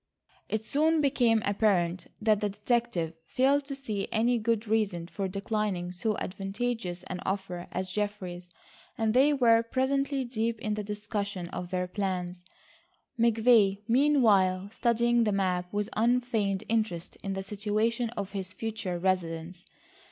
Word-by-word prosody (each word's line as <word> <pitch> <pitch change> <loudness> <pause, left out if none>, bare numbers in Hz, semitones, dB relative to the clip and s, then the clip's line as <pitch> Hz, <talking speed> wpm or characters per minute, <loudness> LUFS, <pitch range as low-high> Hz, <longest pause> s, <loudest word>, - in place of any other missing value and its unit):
It 220 0 -2
soon 315 +5 +2
became 245 -6 +3
apparent 190 -4 +1
that 215 -2 +3
the 210 - +1
detective 205 -5 -1
failed 275 +2 +2
to 275 0 -5
see 215 -8 -3
any 235 +2 +2
good 225 0 0
reason 205 -6 0
for 195 +2 -3
declining 195 -2 -2
so 210 +4 -1
advantageous 195 -1 -3
an 185 0 -5
offer 190 -2 -3
as 185 0 -3
Geoffrey's, 185 -4 -4 0.5
and 220 -1 +1
they 270 +4 +5
were 235 -5 +5
presently 270 +3 0
deep 230 -1 -1
in 215 -2 -2
the 210 0 -3
discussion 205 -3 -4
of 180 - -5
their 180 0 -1
plans, 180 -2 -3 0.8
McVay 220 -3 +4
meanwhile 220 -8 +3
studying 235 0 +2
the 215 - +1
map 180 -2 0
with 205 0 -1
unfeigned 225 -4 +1
interest 215 -7 -1
in 195 - -3
the 190 0 -3
situation 215 +4 -1
of 200 -1 -3
his 190 -2 -4
future 215 -5 -3
residence. 175 -1 -2
210 Hz, 140 wpm, -29 LUFS, 185-230 Hz, 0.8 s, they